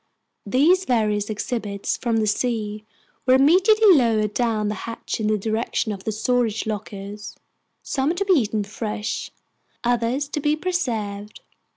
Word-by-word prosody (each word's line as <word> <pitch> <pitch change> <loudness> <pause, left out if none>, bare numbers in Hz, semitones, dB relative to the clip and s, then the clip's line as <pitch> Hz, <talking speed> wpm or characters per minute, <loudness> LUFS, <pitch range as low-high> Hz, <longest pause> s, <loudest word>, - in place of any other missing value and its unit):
These 330 - +3
various 210 -4 +1
exhibits 210 -2 -3
from 235 -2 -1
the 220 - +2
sea 215 -1 -1 0.4
were 255 - +6
immediately 380 +9 +6
lowered 220 -5 +2
down 225 -3 0
the 210 - -1 0.2
hatch 230 - -5
in 215 - 0
the 215 0 +2
direction 220 +2 -1
of 195 -2 -7
the 220 - 0
storage 225 0 0
lockers, 210 0 -6 0.5
some 280 +5 0
to 400 +3 -1
be 390 - +4
eaten 220 - +1
fresh, 210 +1 -4 0.5
others 245 +4 0
to 300 - -3
be 295 +1 +1
preserved. 225 - -3
225 Hz, 145 wpm, -23 LUFS, 210-265 Hz, 0.5 s, were